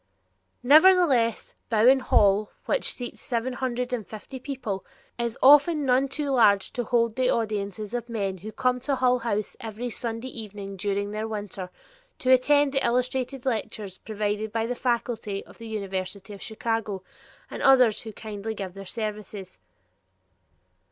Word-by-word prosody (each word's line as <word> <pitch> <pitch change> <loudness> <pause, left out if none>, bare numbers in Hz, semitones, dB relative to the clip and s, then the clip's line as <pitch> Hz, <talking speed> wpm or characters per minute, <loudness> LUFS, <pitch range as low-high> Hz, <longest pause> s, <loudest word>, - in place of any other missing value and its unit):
Nevertheless 290 - +5 0.2
Bowen 235 +4 +5
Hall, 205 -4 +3 0.2
which - - +1
seats 245 -1 -6
seven 245 +1 -2
hundred 250 0 -2
and 225 -5 -3
fifty 220 +4 -9
people, 250 -8 -4 0.4
is 235 -1 -2
often 295 +2 +6
none 260 +1 +3
too 285 +1 -2
large 205 -6 +4
to 245 - -2
hold 230 -1 +1
the 255 -1 +2
audiences 210 -1 -2
of 240 -1 -3
men 195 -5 -2
who 215 +5 -7
come 250 +1 0
to 275 +2 -1
Hull 250 -1 +2
House 215 -3 -2
every 230 +2 -5
Sunday 230 +2 -4
evening 205 -4 -7
during 200 +1 -2
the 215 +1 -3
winter 205 -4 -5 0.5
to 255 - +1
attend 285 +2 +5
the 270 -1 +1
illustrated 250 +2 -1
lectures 215 -5 -3
provided 210 0 -2
by 225 0 0
the 245 - -2
faculty 235 -5 -2
of - - -17
the 230 - -8
University 195 -1 -4
of 200 - -11
Chicago 220 -3 -3 0.5
and - - -6
others 255 -5 +5
who 220 - -7
kindly 215 +1 -6
give 195 -3 -5
their 195 0 -9
services. 210 -3 -5
225 Hz, 150 wpm, -26 LUFS, 205-250 Hz, 0.5 s, often